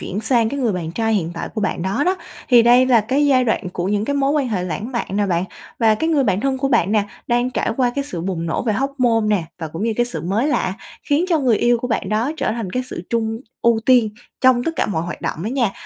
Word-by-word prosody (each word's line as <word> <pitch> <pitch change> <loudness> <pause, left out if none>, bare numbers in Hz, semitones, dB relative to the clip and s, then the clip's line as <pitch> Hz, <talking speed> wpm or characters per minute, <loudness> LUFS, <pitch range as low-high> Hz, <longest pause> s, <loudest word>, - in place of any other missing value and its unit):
chuyển 195 - -4
sang 230 0 +2
cái 280 +2 -4
người 235 -4 +1
bạn 170 -3 -4
trai 225 +3 0
hiện 170 -5 -1
tại 165 - -4
của 220 - -2
bạn 195 - -1
đó 195 +10 0
đó, 370 +1 +1 0.3
thì 240 -3 +7
đây 245 +2 +5
là 240 -3 +5
cái 265 +7 +1
giai 260 -3 +4
đoạn 220 -5 -1
của 180 +1 -2
những 205 +1 0
cái 285 +4 -1
mối 275 0 +2
quan 285 -4 0
hệ 190 -5 -1
lãng 210 +7 -4
mạn 235 - -2
nè 205 -1 +1
bạn. 175 -1 0 0.3
Và 225 -2 +4
cái 320 +9 -1
người 295 -5 +2
bạn 185 - +1
thân 265 +1 0
của 275 +1 0
bạn 215 -7 +2
nè, 210 -2 +3 0.2
đang 240 +1 +1
trải - - -1
qua 250 -2 +2
cái 280 - -1
sự 180 -11 -5
bùng 170 -2 -3
nổ 160 - -1
về 225 - 0
hormone 255 -1 +1 0.2
nè, 170 - -3
và 160 -2 -5
cũng 165 +5 -6
như 230 - +1
cái 240 - +2
sự 245 - -5
mới 210 - 0
lạ 190 -9 0 0.3
khiến 295 +4 +1
cho 335 -3 +3
người 250 -6 +2
yêu 240 0 +3
của 250 - -4
bạn 225 -5 -1
đó 220 +7 0
trở 275 - -1
thành 225 -5 -4
cái 255 +6 -1
sự 170 - -6
chung 225 -1 -1 0.2
ưu 235 -1 +3
tiên 245 -4 +5 0.3
trong 255 -2 +4
tất - - 0
cả - - +1
mọi 165 -6 -1
hoạt 175 - -6
động 160 - -3
đó - - -3
nha, 245 -5 +1
230 Hz, 285 wpm, -20 LUFS, 200-260 Hz, 0.3 s, thì